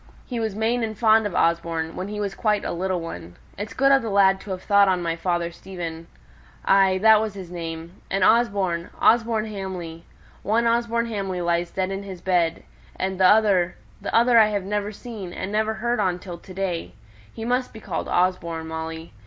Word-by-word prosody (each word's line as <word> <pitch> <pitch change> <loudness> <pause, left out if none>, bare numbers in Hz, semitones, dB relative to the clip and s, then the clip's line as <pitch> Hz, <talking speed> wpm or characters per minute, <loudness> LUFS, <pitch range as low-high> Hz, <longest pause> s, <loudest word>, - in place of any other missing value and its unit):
He 245 -3 -4
was 220 -3 -2
main 225 +3 0
and 220 -2 -3
fond 220 -1 +4
of 185 - -7
Osborne, 165 -1 0
when 185 - -4
he 210 0 -5
was 200 -1 -2
quite 210 -2 0
a - - -2
little 185 +1 -1
one. 85 - -8 0.2
It's 205 +2 -6
good 275 +1 +4
of 270 -1 +5
the 225 - -4
lad 195 -1 +4
to - - -11
have 185 -1 -4
thought 200 -1 +5
on 185 -2 +1
my 165 -1 -1
father 170 0 -1
Stephen. 170 -2 -7 0.6
Ay! 195 -1 +4
that 220 -1 +7
was 215 -2 -3
his 185 -3 -8
name. 165 0 -7
And 195 -1 0
Osborne 200 -7 +2
Osborne 225 -1 +3
Hamley! 185 -6 -6 0.4
One 225 +3 +1
Osborne 235 0 +1
Hamley 195 -5 -3
lies 170 0 0
dead 190 +1 -2
on 195 0 -3
his 195 -3 -8
bed 175 -2 0 0.3
and 190 0 -3
t'other 190 -2 +4 0.3
t'other 235 0 +4
I've 210 -3 +3
never 205 +1 -2
seen, 210 -5 -8
and 190 - -5
never 220 +1 0
heard 240 +1 -1
on 185 -3 +1
till 180 -2 -9
to 185 - -14
day. 175 - -3 0.4
He 225 - -7
must 250 +1 0
be 220 - -10
called - - -4
Osborne, 170 -3 0
Molly. 160 -1 -6
195 Hz, 195 wpm, -24 LUFS, 175-220 Hz, 0.6 s, that